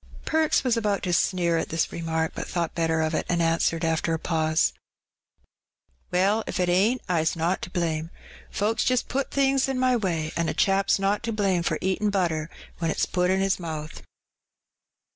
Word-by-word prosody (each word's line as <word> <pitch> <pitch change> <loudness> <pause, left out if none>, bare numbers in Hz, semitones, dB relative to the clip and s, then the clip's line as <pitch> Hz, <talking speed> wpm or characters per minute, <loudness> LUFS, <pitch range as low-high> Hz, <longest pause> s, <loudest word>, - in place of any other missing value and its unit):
Perks 315 -1 +2
was 250 -3 +2
about 210 -3 0
to 180 -2 -1
sneer 170 -2 +2
at - - -3
this 165 0 -1
remark, 160 -1 -2
but - - -5
thought 170 -2 -2
better 160 -1 0
of 160 +1 0
it, - - 0
and 175 - +1
answered, 165 0 +1
after 165 0 0
a - - -2
pause 160 -1 +1 0.4
— - - -47
" 65 - -43
Well, 200 +5 +2
if - - -3
it 180 -1 +1
ain't, 210 +8 +2
Fs 165 -3 +1
not 170 +3 0
to - - -6
blame. 165 -3 -2 0.4
Folks 215 +2 0
just 255 -1 +1
put 275 +1 -2
things 270 -1 +2
in 265 - -1
my 255 0 +3
way; 170 -8 -1
an' 170 -1 0
a - - -3
chap's 195 0 +2
not 195 +1 0
to 230 -1 -3
blame 195 -5 +1
for 170 - -1
eatin' 190 +3 0
butter 170 -5 0 0.3
when 165 -1 0
it's - - 0
put 180 0 0
in 190 +1 +2
his 195 -1 +1
mouth." 155 -2 -6
180 Hz, 200 wpm, -25 LUFS, 165-205 Hz, 0.4 s, my